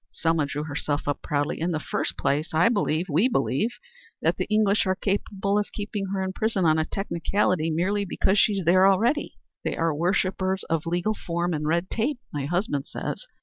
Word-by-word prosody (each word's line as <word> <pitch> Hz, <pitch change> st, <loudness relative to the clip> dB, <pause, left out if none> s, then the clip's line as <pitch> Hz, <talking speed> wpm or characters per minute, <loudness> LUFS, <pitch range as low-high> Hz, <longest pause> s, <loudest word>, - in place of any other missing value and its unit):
Selma 165 Hz, -3 st, 0 dB
drew 145 Hz, +1 st, -3 dB
herself 145 Hz, -1 st, -2 dB
up 145 Hz, -, -1 dB
proudly. 145 Hz, 0 st, -1 dB
"In 170 Hz, -, +1 dB
the 155 Hz, -, 0 dB
first -, -, -3 dB
place 155 Hz, +3 st, 0 dB
I 170 Hz, +7 st, +5 dB
believe 185 Hz, -6 st, 0 dB
we 175 Hz, -, +3 dB
believe 210 Hz, -, +1 dB, 0.5 s
that -, -, +3 dB
the -, -, -2 dB
English 215 Hz, -2 st, +3 dB
are 185 Hz, -, +2 dB
capable 200 Hz, 0 st, 0 dB
of 205 Hz, -, -3 dB
keeping 205 Hz, -1 st, -3 dB
her 190 Hz, 0 st, -2 dB
in 190 Hz, 0 st, -3 dB
prison 215 Hz, -4 st, 0 dB
on 155 Hz, 0 st, +4 dB
a 155 Hz, -, +1 dB
technicality 180 Hz, -2 st, 0 dB
merely 185 Hz, +6 st, 0 dB
because 190 Hz, +2 st, +1 dB
she 210 Hz, -, +4 dB
is 195 Hz, -3 st, -2 dB
there 185 Hz, +3 st, +6 dB
already. 230 Hz, +10 st, +2 dB, 0.3 s
They -, -, -2 dB
are 165 Hz, -1 st, +1 dB
worshippers 185 Hz, +3 st, 0 dB
of 165 Hz, 0 st, -2 dB
legal 175 Hz, +5 st, 0 dB
form 175 Hz, -3 st, -2 dB
and 150 Hz, -1 st, -2 dB
red 170 Hz, +3 st, 0 dB
tape, 250 Hz, +5 st, 0 dB, 0.2 s
my 145 Hz, -2 st, -2 dB
husband 160 Hz, -4 st, -1 dB
says. -, -, -5 dB
180 Hz, 195 wpm, -25 LUFS, 160-200 Hz, 0.5 s, there